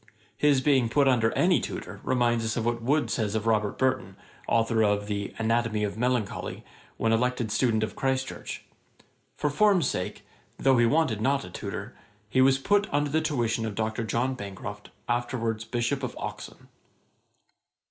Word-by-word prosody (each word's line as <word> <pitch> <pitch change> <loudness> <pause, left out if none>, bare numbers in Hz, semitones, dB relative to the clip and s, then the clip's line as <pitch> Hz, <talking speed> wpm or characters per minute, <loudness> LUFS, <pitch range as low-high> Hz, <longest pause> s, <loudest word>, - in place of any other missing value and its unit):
His 145 -3 +3
being 130 -5 +3
put 140 +4 +3
under 115 -4 +3
any 180 0 +3
tutor - - -6
reminds 120 -2 +1
us 110 +1 -2
of 115 - -1
what 120 0 0
Wood 145 +6 +1
says 110 -4 -1
of 110 0 -1
Robert 105 -2 +1
Burton, 130 -8 0 0.3
authour 115 -1 +2
of 105 -1 +1
the 100 -1 -3
'Anatomy 115 -1 +1
of 100 - -2
Melancholy,' 115 -3 -2 0.3
when 115 - +1
elected 120 -1 0
student 110 -2 +2
of 110 - -4
Christ 135 0 0
Church: - - -7 0.7
'for 150 0 0
form's 195 0 +4
sake, 90 - -4 0.3
though 135 -2 +3
he 120 - +5
wanted 140 -6 +1
not 135 +1 +1
a 90 - -10
tutor, - - -6 0.3
he 130 +5 +2
was 135 0 +5
put 205 +8 +1
under 145 0 +1
the 160 +2 +2
tuition 120 -7 0
of 110 -2 -3
Dr. 110 +1 -2
John 120 +4 0
Bancroft, 105 -2 -7 0.2
afterwards 115 -2 -1
Bishop 120 +3 -1
of 125 - -5
Oxon.' - - -7
120 Hz, 170 wpm, -27 LUFS, 110-135 Hz, 0.7 s, he